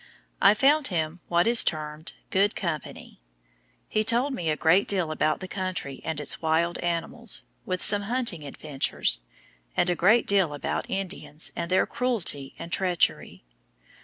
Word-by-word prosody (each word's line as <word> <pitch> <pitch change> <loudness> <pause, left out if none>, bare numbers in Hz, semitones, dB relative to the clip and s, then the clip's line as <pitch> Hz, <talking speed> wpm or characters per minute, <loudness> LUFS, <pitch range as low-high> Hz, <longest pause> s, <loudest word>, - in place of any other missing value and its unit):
I 210 - +6
found 280 +5 +3
him 165 -1 -2
what 170 0 +2
is 235 0 +7
termed 155 0 -4 0.2
"good 200 +2 +2
company." 155 - -6 0.7
He 215 - 0
told 240 +5 +1
me 170 -10 -2
a 155 - 0
great 170 +5 +3
deal 180 -5 0
about 155 +1 0
the 185 - -5
country 185 -8 -4
and 160 -2 -3
its 145 - 0
wild 165 +2 0
animals, 175 +7 -2 0.2
with 185 -1 -2
some 205 -1 +7
hunting 235 -11 -2
adventures, 140 - -2 0.6
and 180 - +3
a - - 0
great 215 +8 +4
deal 190 -7 +2
about 145 - -4
Indians 185 -5 -3
and 170 - -4
their 185 - +3
cruelty 215 - -2
and 170 - -8
treachery. 180 -2 0
175 Hz, 155 wpm, -26 LUFS, 155-205 Hz, 0.7 s, is